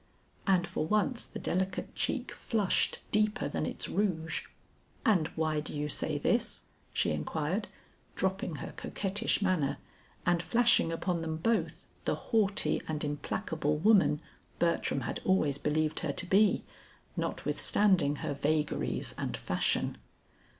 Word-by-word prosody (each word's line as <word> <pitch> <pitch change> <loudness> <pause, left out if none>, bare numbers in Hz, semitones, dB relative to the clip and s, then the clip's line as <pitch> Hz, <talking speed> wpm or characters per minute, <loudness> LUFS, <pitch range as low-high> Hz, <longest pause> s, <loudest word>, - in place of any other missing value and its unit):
and 185 -3 +4
for 175 -2 -2
once 215 +5 +1
the - - -8
delicate 185 +1 -1
cheek - - -1
flushed 210 -5 +1
deeper 215 -7 +2
than 145 - -2
its - - -4
rouge. 170 -5 -1 0.6
"And 180 -8 +4
why 155 -1 +1
do 150 0 -5
you 150 0 -1
say - - 0
this?" 65 - +1 0.3
she - - +1
inquired, 155 - -1 0.5
dropping 190 -1 -1
her 140 - -6
coquettish 200 +1 -1
manner 180 -8 +1 0.5
and 175 -1 +3
flashing 235 -4 +4
upon 170 +1 -1
them 160 -1 -2
both, 170 -3 0 0.2
the - - +1
haughty 205 -3 +1
and 155 -1 -2
implacable 150 +1 -1
woman 190 -4 +4 0.4
Bertram 170 -5 +1
had - - -3
always 150 -7 +2
believed 155 +1 0
her 155 -5 -2
to 185 - -3
be, 195 +3 +4 0.5
notwithstanding 180 -9 +2
her 145 - -1
vagaries 150 +2 0
and - - -2
fashion. - - 0
170 Hz, 130 wpm, -31 LUFS, 150-195 Hz, 0.6 s, and